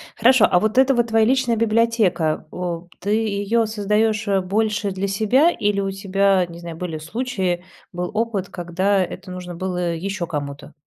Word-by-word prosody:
Хорошо, 240 -1 +5
а 180 - +4
вот 215 +5 -1
это 265 +1 +5
вот 240 -1 +2
твоя 225 -1 +3
личная 255 -1 +2
библиотека. 215 -9 +1
О, 175 -1 -4
ты 200 - -5
её 220 +1 +1
создаешь, 215 0 0
э, 195 -1 +2
больше 210 +2 0
для 190 +1 -2
себя 220 - +3
или 205 -8 0
у 195 0 -2
тебя, 195 -1 +2
не 170 -1 -11
знаю, 170 -1 -8
были 165 -2 -4
случаи, 190 -1 -2 0.3
был 180 0 -3
опыт, 215 -3 -1
когда 185 +3 0
это 185 +1 -8
нужно 180 -1 -7
было 180 -1 -2
еще 190 +1 -3
кому-то? 145 -2 -6
200 Hz, 170 wpm, -21 LUFS, 180-220 Hz, 0.3 s, Хорошо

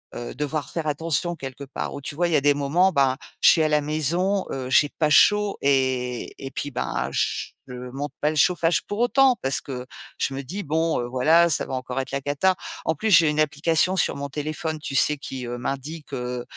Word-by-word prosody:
heu, 120 - -6
devoir 150 +1 -3
faire 165 -2 -4
attention 165 +3 +1
quelque 135 -2 -8
part 135 - -5
où, - - -6
tu 145 +1 -7
vois, 175 +2 +1
il - - -2
y - - +3
des 145 +1 +4
moments 155 +7 +2
ben, 135 -3 +2 0.2
je - - +8
suis 165 - +5
à - - +2
la 150 -1 +2
maison, 170 +6 0
heu, 130 -1 -4
j'ai 145 +2 +5
pas 155 -2 +2
chaud 205 +6 +4
et 130 -3 0
et 135 - -7
puis 145 +1 -5
ben, 125 - -3
je - - -1 0.4
monte 145 +1 -4
pas 150 - +1
le 155 - -3
chauffage 170 +2 +3
pour 205 - -5
autant 255 +1 +4
parce 135 0 +1
que 125 -2 -7 0.3
je - - -1
me 135 - -4
dis 190 +10 -6
bon, 160 +1 0
heu: 120 - -2
«Voilà, 155 +8 +4
ça 155 - +2
va - - -7
encore 130 +1 -5
être 130 - -8
la 140 - -1
cata». 145 +7 +1 0.3
En 160 - +1
plus, 220 +8 -2
j'ai 170 -5 +6
une 150 0 -1
application 160 +4 +2
sur 185 - +2
mon 140 0 -4
téléphone, 155 +2 -4
tu 145 -2 -5
sais, 150 +2 +4
qui, 135 -3 -6
heu, 120 0 -5
m'indique, 140 +5 -6
heu 125 -1 -4
150 Hz, 225 wpm, -23 LUFS, 135-165 Hz, 0.4 s, je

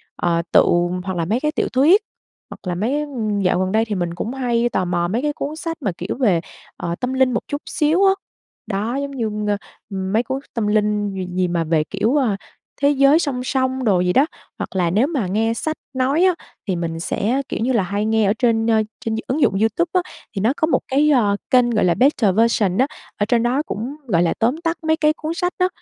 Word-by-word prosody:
ờ, 170 -1 +1
tự - - +7 0.4
hoặc 190 -2 -3
là 165 - 0
mấy 220 +8 0
cái 300 +1 0
tiểu 305 - -1
thuyết, 305 +11 +5 0.5
hoặc - - -10
là 175 - -1
mấy, 240 +11 0
ưm, 225 -8 -2
dạo 180 -1 +2
gần 185 0 0
đây 220 +1 +2
thì 215 -2 -3
mình 175 -2 -2
cũng 225 +7 -4
hay 240 -2 0
tò 185 - 0
mò 175 -1 0
mấy 225 +8 -1
cái 295 0 -1
cuốn 295 +2 -4
sách 330 0 -4
mà, 205 - 0
kiểu, 180 - -4
về, 205 -11 +3 0.4
ờ, 170 0 -3
tâm 255 +1 -2
linh 260 -1 +3
một - - 0
chút 285 +1 -4
xíu 320 +6 +2
á 385 - +6 0.5
đó, 215 +4 -2
giống 280 0 -3
như, 235 -5 -2
ng 205 -2 -4
mấy 225 +2 +3
cuốn 265 +1 -3
tâm 225 -3 -1
linh 210 -1 +1
gì 185 -1 -4
gì 185 0 +1
mà 170 -1 0
về, 155 -1 +1
kiểu, 210 - -1
ờ, 250 -8 +2 0.5
thế 285 - +5
giới 275 +2 +5
song 265 -6 -2
song 260 0 -1
đồ 195 -6 +3
gì 180 0 +1
đó. 270 - +5 0.3
Hoặc - - -6
là 175 -2 +2
nếu 215 +10 +2
mà 275 - -1
nghe 225 +4 +1
sách 315 +7 -3 0.2
nói 265 +6 +2
á, 370 -2 +4 0.3
thì 190 - 0
mình 165 -1 -3
sẽ, 230 +9 0
kiểu - - -3
như 250 +3 +1
là, 225 -6 +2
hay 200 +3 -2
nghe 220 -1 +2
ở 200 - +3
trên, 225 -2 +2
ơ, 220 -1 +4 0.2
trên 220 -1 0
d - - -2
ứng 280 +5 -1
dụng 260 - +4
YouTube 315 +10 +1
á 365 - +3 0.3
thì 195 - -1
nó 225 +6 +2
có 315 - +2
một - - +2
cái, 290 +3 +3
ờ, 220 -8 +3
kênh, 250 -1 +4
gọi 220 -5 +2
là, 175 - +4
Better 220 - +3
Version 215 -4 +2
á, 260 +3 +3 0.3
ở 205 - +1
trên 235 +1 +2
đó 255 +4 +1
cũng, 245 +2 -5
gọi 175 -6 +3
là, 170 - +1
tóm 240 +6 +2
tắt 330 -1 0
mấy 315 0 +2
cái 305 -1 +3
cuốn 315 +1 -4
sách 355 0 -1
á, 365 - +3
230 Hz, 245 wpm, -20 LUFS, 195-275 Hz, 0.5 s, tự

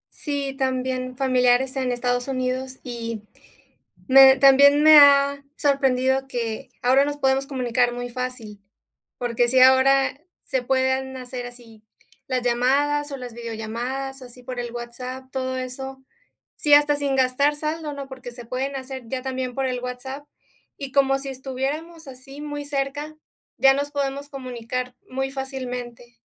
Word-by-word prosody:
Sí, 280 -2 -3
también 255 -1 -2
familiares 255 0 +2
en 260 -2 -1
Estados 245 +1 -1
Unidos, 260 0 -3
y 230 -3 -5 0.8
me 265 0 +8
también 280 +2 +6
me 310 0 +9
ha 280 0 +5
sorprendido 270 -1 +1
que 230 -4 -4
ahora 260 +3 +5
nos 290 0 -3
podemos 270 0 +1
comunicar 245 -3 0
muy 245 0 -5
fácil, 240 -4 -6 0.6
porque 240 0 0
sí, 255 +1 +3
ahora 270 +1 +5 0.3
se 265 -3 -1
pueden 260 +1 0
hacer 250 -1 -6
así 235 -3 -14 0.4
las 255 -2 -1
llamadas 285 +5 +1
o 275 - -4
las 250 -2 -8
videollamadas, 240 +4 -5
así 250 0 -13
por 250 -1 -6
el 240 -1 -4
WhatsApp, 250 +2 -7
todo 260 0 -3
eso. 265 +1 -6 0.5
Sí, 295 -1 +2
hasta 290 0 +4
sin 280 -2 -1
gastar 265 +3 +2
saldo, 305 0 -3
¿no? 280 -1 -7
Porque 260 -2 -9
se 240 -1 -11
pueden 265 +3 -3
hacer 260 -1 -6
ya 255 +1 -4
también 260 -1 -4
por 270 -1 -1
el 250 -1 -3
WhatsApp. 265 +3 -7 0.5
Y 275 -2 -6
como 270 0 +3
si 275 0 -5
estuviéramos 275 +5 -5
así, 270 +2 -11
muy 290 -1 -5
cerca, 290 +2 -3 0.4
ya 270 0 +6
nos 285 +1 -2
podemos 280 0 -3
comunicar 250 -1 -5
muy 270 +1 -3
fácilmente. 250 -3 -6
260 Hz, 150 wpm, -23 LUFS, 250-275 Hz, 0.8 s, me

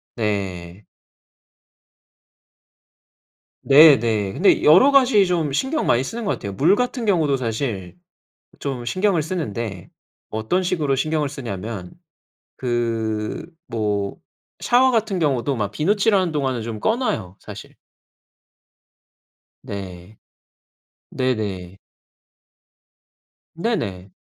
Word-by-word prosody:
네. 95 -4 -3 2.8
네 145 +1 +8
네. 110 -4 -1
근데 195 - +3
여러 185 - +7
가지 255 -7 +5
좀 165 -6 -1
신경 265 - -1
많이 120 +2 +3
쓰는 230 - -5
것 200 - 0
같아요. 100 - -4
물 150 - +3
같은 250 0 -2
경우도 160 -9 +2
사실 115 -6 -4 0.6
좀 130 -4 -4
신경을 185 - +1
쓰는데 115 - -5 0.4
어떤 110 +13 -1
식으로 160 -6 0
신경을 150 +1 -1
쓰냐면 110 -7 -6 0.6
그 115 -3 -2 0.2
뭐 105 -3 -2 0.4
샤워 255 +2 +4
같은 220 -4 0
경우도 140 -4 0
막 105 -3 -3
비누칠하는 195 - +1
동안은 130 -5 -1
좀 110 -1 -5
꺼 220 - +1
놔요, 155 - -3
사실. - - -11 1.9
네. 95 0 -8 0.9
네네. 105 -8 -3 1.8
네네. 105 - -3
130 Hz, 185 characters per minute, -21 LUFS, -, 2.8 s, 네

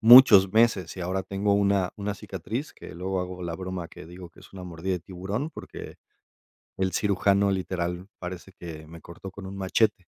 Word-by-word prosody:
muchos 110 -5 +10
meses. 110 -6 +3
Y - - -5
ahora 95 +2 -1
tengo 100 +2 0
una, 100 -2 +2
una 105 0 -2
cicatriz 115 - -5
que - - -11
luego 95 +2 -2
hago 90 0 -5
la 85 -1 -3
broma, 95 -1 -5
que 75 - -11
digo 90 0 -10
que - - -18
es - - -16
una 95 -1 -8
mordida 90 +2 -3
de 90 - -4
tiburón, 95 - -4
porque, - - -9 0.8
el 95 -1 0
cirujano 100 0 +3
literal 90 -1 -2
parece 90 +1 -7
que 80 -4 -9
me 85 +1 -11
cortó 85 +3 -10
con 95 0 -8
un 95 +1 -7
machete. 95 0 +1
95 Hz, 190 wpm, -27 LUFS, 90-100 Hz, 0.8 s, muchos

